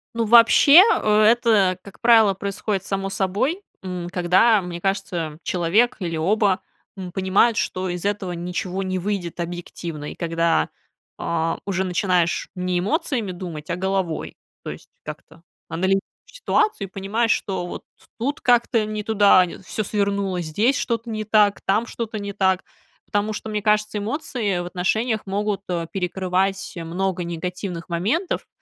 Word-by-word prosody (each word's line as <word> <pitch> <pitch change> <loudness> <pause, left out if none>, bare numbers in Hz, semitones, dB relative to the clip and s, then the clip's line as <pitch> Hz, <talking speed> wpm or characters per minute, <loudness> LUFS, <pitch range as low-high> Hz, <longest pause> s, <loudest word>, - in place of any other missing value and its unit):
Ну, 230 - 0
вообще, 240 - +8 0.2
это, 215 -3 +4
как 200 - -14
правило, 225 -4 +5
происходит 200 0 -3
само 195 0 -2
собой, 205 - -1 0.2
м, 180 -2 -5
когда, 190 +5 +4
мне 175 -1 -6
кажется, 170 -4 -2
человек 185 +9 +2
или 170 -4 -3
оба, 195 +3 +2 0.4
м, 185 -2 -7
понимают, 190 +5 +2
что 185 0 -1
из 175 +1 -4
этого 200 -3 -1
ничего 180 +2 -3
не 185 0 -2
выйдет 180 -3 -3
объективно 170 -3 -5
и - - -10
когда, 165 - +1 0.5
э, 165 0 -1
уже 190 -1 -1
начинаешь 180 -2 0
не 180 -1 -1
эмоциями 240 - -1
думать, 170 -4 -7
а - - 0
головой. 190 -3 -2 0.3
То - - -5
есть - - -9
как-то 155 +2 -10 0.3
анализируешь 190 +3 +1 0.3
ситуацию 430 - 0
и - - -44
понимаешь, 215 +4 0
что 185 -3 -1
вот 175 - -6 0.4
тут 275 +5 -2
как-то 240 -2 +3
не 215 0 -4
туда 205 -3 +5
нь 180 - -10
всё 215 - -3
свернуло, 200 -3 -1
здесь 210 - +1
что-то 230 0 -2
не 215 -1 -3
так, 210 -1 +3
там 215 +4 +1
что-то 225 -3 -5
не 200 0 -5
так. 190 -2 +1 0.4
Потому 205 +1 -1
что, 220 - -6
мне 210 -1 -2
кажется, 210 0 +1
эмоции 215 - -2
в 175 - -4
отношениях 215 +6 -1
могут, 200 +1 -1
э, 170 -2 -2
перекрывать 190 +1 -1
много 180 +2 -2
негативных 175 +1 -5
моментов, 215 - -1
195 Hz, 150 wpm, -22 LUFS, 180-215 Hz, 0.5 s, вообще